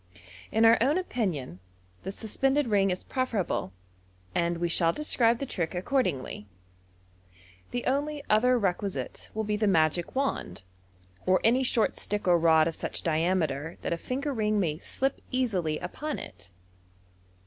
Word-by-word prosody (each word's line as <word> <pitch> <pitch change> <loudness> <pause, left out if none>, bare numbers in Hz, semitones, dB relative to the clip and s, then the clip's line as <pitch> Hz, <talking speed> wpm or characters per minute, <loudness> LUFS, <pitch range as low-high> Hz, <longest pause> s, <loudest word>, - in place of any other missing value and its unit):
In 225 +1 +4
our 225 0 +7
own 280 +7 +3
opinion, 180 - -2 0.4
the 190 - -5
suspended 270 +7 0
ring 200 -4 +2
is 180 0 -2
preferable, 230 - -1 0.6
and 170 0 0
we 175 +1 0
shall 165 0 +3
describe 240 - +2
the 275 - -4
trick 180 -8 -3
accordingly. 180 - -1 1.2
The 245 - -3
only 290 +2 -1
other 250 +4 +4
requisite 195 -2 -2
will 220 - -1
be 210 0 -1
the 215 0 +1
magic 165 - +2
wand, 265 - -2 0.6
or 185 0 +4
any 245 +4 +4
short 245 -3 +1
stick 205 -2 -3
or 175 -1 +5
rod 160 -1 +5
of 165 - -2
such - - -4
diameter 160 -2 0
that - - -1
a - - -2
finger 275 - -3
ring 215 -3 +1
may 160 -5 -1
slip 270 +7 -1
easily 195 - 0
upon 295 +12 -4
it. 90 0 -9
205 Hz, 150 wpm, -28 LUFS, 170-255 Hz, 1.2 s, our